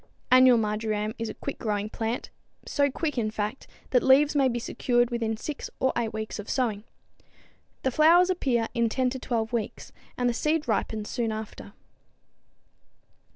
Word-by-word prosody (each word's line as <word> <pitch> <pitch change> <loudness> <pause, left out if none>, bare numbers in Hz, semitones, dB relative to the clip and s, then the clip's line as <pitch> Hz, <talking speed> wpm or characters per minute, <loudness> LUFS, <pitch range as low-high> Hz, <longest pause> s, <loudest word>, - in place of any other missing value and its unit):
Annual 255 -1 +7
marjoram 215 0 -1
is 230 -1 -3
a - - -7
quick 280 - -6
growing 210 -2 -1
plant 225 +2 -4 0.3
so 285 -1 +1
quick, 295 -1 -2
in 215 -2 0
fact, 215 +4 -4 0.2
that 250 - +4
leaves 280 +3 +5
may 275 -2 +4
be 240 -2 -1
secured 240 0 0
within 225 -2 -1
six 290 +5 -5
or 260 - +2
eight 230 -2 -1
weeks 220 0 -5
of 205 - -7
sowing. 220 -5 -1 1.0
The 265 - +1
flowers 340 +6 +5
appear 245 -10 0
in 235 -1 +1
10 255 +2 0
to 260 - -5
12 230 -2 -2
weeks, 225 -3 -4 0.3
and 245 - +1
the 240 - +1
seed 300 +4 0
ripens 215 -1 -1
soon 230 -2 -2
after. 215 -2 -7
235 Hz, 165 wpm, -27 LUFS, 220-265 Hz, 1.0 s, Annual